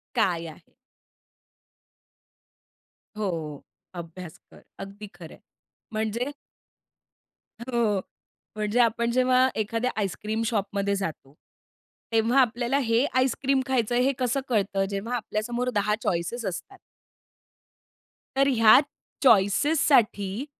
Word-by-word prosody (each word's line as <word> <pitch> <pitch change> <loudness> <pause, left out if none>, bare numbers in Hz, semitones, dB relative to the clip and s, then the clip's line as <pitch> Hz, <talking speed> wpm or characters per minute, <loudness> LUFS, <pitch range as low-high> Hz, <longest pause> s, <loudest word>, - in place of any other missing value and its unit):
काय 170 -2 +1
आहे? 160 +2 -14 2.4
हो, 165 -8 -4 0.3
अभ्यास 170 -1 -9
कर - - -17 0.2
अगदी 200 +2 -8
खरंय. - - -12 0.6
म्हणजे 220 +5 -2 1.3
हो 235 -5 0 0.6
म्हणजे 215 +2 -1
आपण 235 0 +2
जेव्हा 255 +1 +4
एखाद्या 230 +3 -1
आईसक्रीम 215 +2 -2
शॉपमध्ये 200 -2 -1
जातो 160 -8 -5 0.8
तेव्हा 230 +4 +3
आपल्याला 240 +2 0
हे 235 0 +2
आईसक्रीम 265 +1 +1
खायचंय 245 -2 +1
हे 275 - +3
कसं 250 +1 0
कळतं 195 -3 +1
जेव्हा 205 +5 -3
आपल्या 215 -2 -3
समोर 240 +2 -2
10 210 +1 +2
चॉईसेस 180 +7 -2
असतात. 190 - -6 1.6
तर 275 0 +4
ह्या 225 -4 +7 0.4
चॉईसेससाठी 230 -1 +3
220 Hz, 95 wpm, -26 LUFS, 195-245 Hz, 2.4 s, ह्या